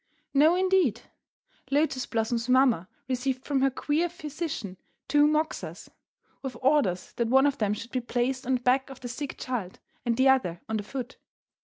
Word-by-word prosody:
'" -, -, -48 dB
No, 325 Hz, +3 st, +6 dB
indeed. 365 Hz, -, +2 dB, 0.7 s
Lotus 275 Hz, -2 st, +1 dB
Blossom's 230 Hz, +1 st, -1 dB
mamma 250 Hz, -9 st, +4 dB, 0.2 s
received 255 Hz, 0 st, -2 dB
from 275 Hz, -2 st, +1 dB
her 270 Hz, -, +4 dB
queer 300 Hz, +6 st, 0 dB
physician 305 Hz, -, -5 dB, 0.3 s
two 295 Hz, +1 st, +5 dB
"moxas," 310 Hz, +1 st, -2 dB, 0.5 s
with 265 Hz, -2 st, -5 dB
orders 260 Hz, -10 st, +1 dB
that 235 Hz, -, +1 dB
one 265 Hz, +3 st, +5 dB
of 285 Hz, -1 st, +1 dB
them 210 Hz, -1 st, +1 dB
should 230 Hz, +3 st, -8 dB
be 255 Hz, -, -1 dB
placed 250 Hz, +2 st, -1 dB
on 260 Hz, -, +3 dB
the 245 Hz, -, -3 dB
back 260 Hz, +2 st, +2 dB
of 265 Hz, -1 st, -11 dB
the 250 Hz, -, -5 dB
sick 270 Hz, +3 st, -5 dB
child, 225 Hz, -8 st, -4 dB, 0.3 s
and 235 Hz, -1 st, 0 dB
the 260 Hz, +1 st, +4 dB
other 250 Hz, -11 st, +3 dB
on 220 Hz, 0 st, -1 dB
her -, -, -4 dB
foot. 255 Hz, +3 st, -6 dB
260 Hz, 180 wpm, -27 LUFS, 235-285 Hz, 0.7 s, No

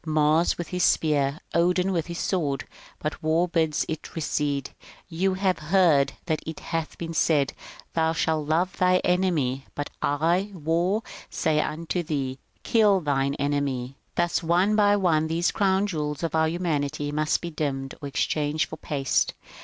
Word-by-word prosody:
Mars 155 Hz, +1 st, +2 dB
with 175 Hz, -, -5 dB
his 180 Hz, -1 st, -1 dB
spear, 145 Hz, -3 st, +2 dB
Odin 180 Hz, +2 st, +2 dB
with 170 Hz, -4 st, -1 dB
his 170 Hz, -1 st, -5 dB
sword. 145 Hz, -10 st, -1 dB, 0.3 s
But 150 Hz, -, -4 dB
war 160 Hz, +3 st, +2 dB
bids 160 Hz, -3 st, +1 dB
it 160 Hz, -1 st, -6 dB
recede: 145 Hz, -3 st, -1 dB, 0.2 s
*' -, -, -25 dB
You 190 Hz, 0 st, +3 dB
have 190 Hz, -1 st, +1 dB
heard 155 Hz, -4 st, +3 dB
that 160 Hz, -3 st, -1 dB
it 160 Hz, -1 st, -6 dB
hath 165 Hz, -1 st, -4 dB
been 165 Hz, -1 st, -5 dB
said, 150 Hz, -4 st, +2 dB, 0.2 s
* -, -, -20 dB
Thou 160 Hz, -1 st, +2 dB
shalt 160 Hz, -2 st, 0 dB
love 175 Hz, +4 st, +1 dB
thy 185 Hz, 0 st, +4 dB
enemy,' 155 Hz, -8 st, +1 dB
but 145 Hz, 0 st, -4 dB
I, 170 Hz, +7 st, +1 dB
War, 175 Hz, +6 st, 0 dB, 0.3 s
say 155 Hz, -2 st, +1 dB
unto 165 Hz, +4 st, -2 dB
thee, 140 Hz, -5 st, -3 dB
* -, -, -41 dB
Kill 210 Hz, -4 st, +4 dB
thine 140 Hz, -2 st, 0 dB
enemy.' 140 Hz, -3 st, -1 dB
" -, -, -43 dB
Thus 175 Hz, 0 st, +1 dB
one 180 Hz, +5 st, +2 dB
by 205 Hz, -1 st, +5 dB
one 165 Hz, -6 st, +2 dB
these 165 Hz, +2 st, +1 dB
crown 195 Hz, -1 st, +2 dB
jewels 150 Hz, -5 st, -3 dB
of 165 Hz, -, -1 dB
our 160 Hz, 0 st, +3 dB
humanity 150 Hz, -4 st, -1 dB
must 150 Hz, +1 st, +1 dB
be 170 Hz, -, -6 dB
dimmed 135 Hz, -3 st, -3 dB
or 145 Hz, -, -4 dB
exchanged 150 Hz, +2 st, 0 dB
for 160 Hz, -, -7 dB
paste. 140 Hz, -3 st, 0 dB
160 Hz, 170 wpm, -25 LUFS, 145-175 Hz, 0.3 s, by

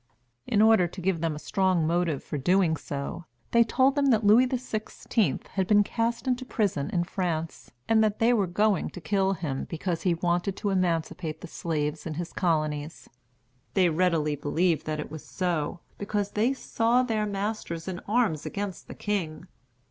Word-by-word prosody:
In 210 Hz, -1 st, +3 dB
order 220 Hz, -5 st, +5 dB
to 180 Hz, -, -10 dB
give 180 Hz, -2 st, 0 dB
them 165 Hz, -2 st, 0 dB
a 150 Hz, -, -10 dB
strong 185 Hz, -4 st, +2 dB
motive 165 Hz, -3 st, 0 dB
for 150 Hz, -, -4 dB
doing 180 Hz, +2 st, +3 dB
so, 145 Hz, +3 st, -5 dB, 0.3 s
they 235 Hz, 0 st, +6 dB
told 260 Hz, +4 st, +3 dB
them 285 Hz, -1 st, +2 dB
that 225 Hz, -4 st, +3 dB
Louis 220 Hz, +5 st, +6 dB
XVI. 225 Hz, -, -2 dB
had 190 Hz, -2 st, -1 dB
been 205 Hz, 0 st, +5 dB
cast 230 Hz, +4 st, -2 dB
into 255 Hz, 0 st, 0 dB
prison 200 Hz, -, -1 dB
in 175 Hz, -, 0 dB
France, 170 Hz, -3 st, -3 dB, 0.2 s
and 220 Hz, -1 st, +4 dB
that 215 Hz, -1 st, +1 dB
they 235 Hz, +1 st, +4 dB
were 205 Hz, -5 st, +2 dB
going 205 Hz, +1 st, +1 dB
to -, -, -9 dB
kill 195 Hz, +4 st, +1 dB
him, 155 Hz, -7 st, -3 dB
because 170 Hz, 0 st, -2 dB
he 180 Hz, -3 st, +2 dB
wanted 175 Hz, +3 st, 0 dB
to 205 Hz, -, -1 dB
emancipate 165 Hz, -3 st, -1 dB
the -, -, -7 dB
slaves 155 Hz, -1 st, -3 dB
in 155 Hz, -, -4 dB
his 170 Hz, +2 st, -5 dB
colonies. 155 Hz, -3 st, -1 dB, 0.6 s
They 185 Hz, -3 st, +4 dB
readily 160 Hz, -3 st, +1 dB
believed 160 Hz, +4 st, 0 dB
that 155 Hz, 0 st, -2 dB
it 150 Hz, -, -6 dB
was 155 Hz, -1 st, -7 dB
so, 175 Hz, -3 st, -2 dB, 0.2 s
because 205 Hz, 0 st, -2 dB
they 225 Hz, +5 st, +2 dB
saw 245 Hz, -2 st, +1 dB
their 220 Hz, -4 st, 0 dB
masters 200 Hz, -4 st, -3 dB
in 180 Hz, -2 st, -4 dB
arms 210 Hz, -9 st, +1 dB
against 200 Hz, -2 st, -5 dB
the -, -, -9 dB
king. 180 Hz, -6 st, -3 dB
185 Hz, 180 wpm, -27 LUFS, 160-215 Hz, 0.6 s, they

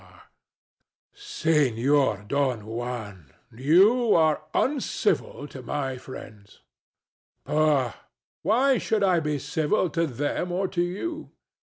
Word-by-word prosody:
[mortified] -, -, -20 dB, 0.9 s
Senor 145 Hz, -, +1 dB
Don 130 Hz, -5 st, 0 dB
Juan: 110 Hz, -, -6 dB, 0.2 s
you 195 Hz, -, +4 dB
are 155 Hz, -2 st, +3 dB
uncivil 255 Hz, -, -1 dB
to 130 Hz, -, -9 dB
my 135 Hz, +1 st, -3 dB
friends. 105 Hz, -6 st, -12 dB, 0.8 s
DON -, -, -5 dB
JUAN. 150 Hz, -6 st, +3 dB
Pooh! -, -, -18 dB, 0.4 s
why 260 Hz, +5 st, +3 dB
should 215 Hz, -2 st, 0 dB
I 185 Hz, -3 st, +3 dB
be 150 Hz, -2 st, -1 dB
civil 160 Hz, +5 st, 0 dB
to 165 Hz, 0 st, 0 dB
them 145 Hz, +7 st, -2 dB
or 190 Hz, +2 st, 0 dB
to 175 Hz, -, -1 dB
you? 305 Hz, -, -4 dB
150 Hz, 120 wpm, -25 LUFS, 125-190 Hz, 0.9 s, you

